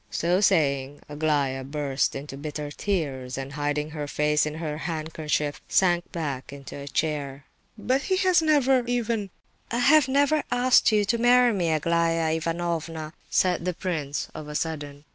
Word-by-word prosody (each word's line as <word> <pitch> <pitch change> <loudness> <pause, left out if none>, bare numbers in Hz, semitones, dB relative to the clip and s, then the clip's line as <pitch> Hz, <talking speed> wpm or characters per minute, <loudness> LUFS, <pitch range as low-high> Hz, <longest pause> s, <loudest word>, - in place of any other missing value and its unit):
So 175 +3 +1
saying, 145 -7 +1
Aglaya 145 -3 0
burst 140 0 -1
into 135 0 -6
bitter 150 +1 -5
tears, 140 -9 -3
and, 135 +1 -6
hiding 150 +1 -2
her 150 -1 -5
face 150 +1 +1
in 150 - -5
her 155 -2 -4
handkerchief, 155 -3 -2
sank 175 -2 +2
back 145 -6 -4
into 140 -1 -9
a 140 0 -8
chair. 145 -2 -2 0.3
"But 255 +5 0
he 375 +4 0
has 370 -3 +4
never 270 -5 +3
even—" 230 -4 -1 0.4
"I 235 - -2
have 280 +3 +5
never 285 +3 +3
asked 245 -1 +4
you 210 -1 +3
to 235 +3 0
marry 245 0 +5
me, 175 -4 0
Aglaya 165 +1 +1
Ivanovna!" 165 -1 -3 0.2
said 180 -2 +2
the 180 -1 -2
prince, 155 -6 -3
of 155 - -8
a 150 - -7
sudden. 145 -2 -4
160 Hz, 160 wpm, -25 LUFS, 145-205 Hz, 0.4 s, have